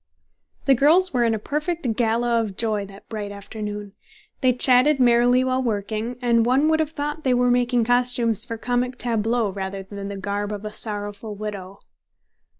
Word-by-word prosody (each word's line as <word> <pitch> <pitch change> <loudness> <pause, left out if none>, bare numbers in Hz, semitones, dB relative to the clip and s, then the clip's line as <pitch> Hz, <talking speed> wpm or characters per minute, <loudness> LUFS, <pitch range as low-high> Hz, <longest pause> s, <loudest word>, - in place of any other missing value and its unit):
The 275 - +5
girls 320 +8 +4
were 245 -2 +2
in 230 -1 +2
a - - -2
perfect 300 - -2
gala 235 0 +1
of 205 -4 -5
joy 215 -3 -1
that 195 +1 -15
bright 210 -2 -5
afternoon. 205 0 -7 0.5
They 255 -2 +4
chatted 255 +3 +3
merrily 245 +1 +4
while 260 0 0
working, 220 +1 -3
and 235 -1 +3
one 265 +6 +3
would 315 0 +2
have 315 -2 0
thought 295 0 -4
they 255 -2 +2
were 245 0 +3
making 245 -1 +2
costumes 245 -2 +2
for 230 -1 -5
comic 245 +2 -1
tableaux 230 -2 0
rather 195 0 -5
than 200 +1 -7
the 200 0 -6
garb 205 +1 -3
of 205 0 -7
a 210 - -6
sorrowful 205 0 -4
widow. 200 -2 -7
230 Hz, 175 wpm, -23 LUFS, 205-250 Hz, 0.5 s, The